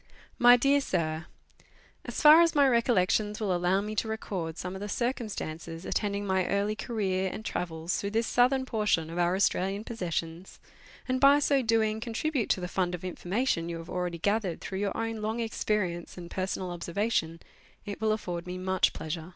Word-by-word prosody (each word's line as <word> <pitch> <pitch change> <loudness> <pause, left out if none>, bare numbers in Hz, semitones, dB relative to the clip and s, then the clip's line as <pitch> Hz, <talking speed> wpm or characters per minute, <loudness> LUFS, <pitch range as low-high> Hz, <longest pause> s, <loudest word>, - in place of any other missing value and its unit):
MY 245 0 +8
DEAR 280 +3 +3
SIR, 160 -7 -2 0.8
As - - -4
far 305 +2 +10
as 335 -2 +3
my 285 -1 +5
recollections 215 -3 +2
will 200 -4 0
allow 180 +3 +2
me 210 +1 -4
to 225 - 0
record 185 -7 -4
some 180 +1 -5
of 190 - -7
the 205 - -4
circumstances 195 -9 -4
attending 205 -1 -1
my 190 -2 +1
early 205 +2 0
career 190 -5 -1
and 220 - -7
travels 165 -2 -3
through 200 - -2
this 225 +2 0
southern 255 +3 +3
portion 210 -9 0
of 170 - -4
our 175 +1 +2
Australian 195 +1 0
possessions, 175 -5 -4 0.5
and 255 0 0
by 280 +1 +7
so 280 -1 +2
doing 220 -2 +1
contribute 240 +3 -2
to - - +2
the 180 - -4
fund 180 0 -1
of 175 - -11
information 180 0 -1
you 170 - -4
have 165 +1 -9
already 180 -1 -2
gathered 200 0 0
through 190 - -5
your 200 -1 -2
own 225 0 -2
long 220 +2 -2
experience 210 -7 -2
and 170 -1 -9
personal 185 -1 -3
observation, 170 -1 -1 0.5
it 205 0 -6
will 220 -1 +2
afford 180 -5 -3
me 180 0 -4
much 185 0 +1
pleasure. 160 +1 -5
200 Hz, 185 wpm, -29 LUFS, 175-225 Hz, 0.8 s, far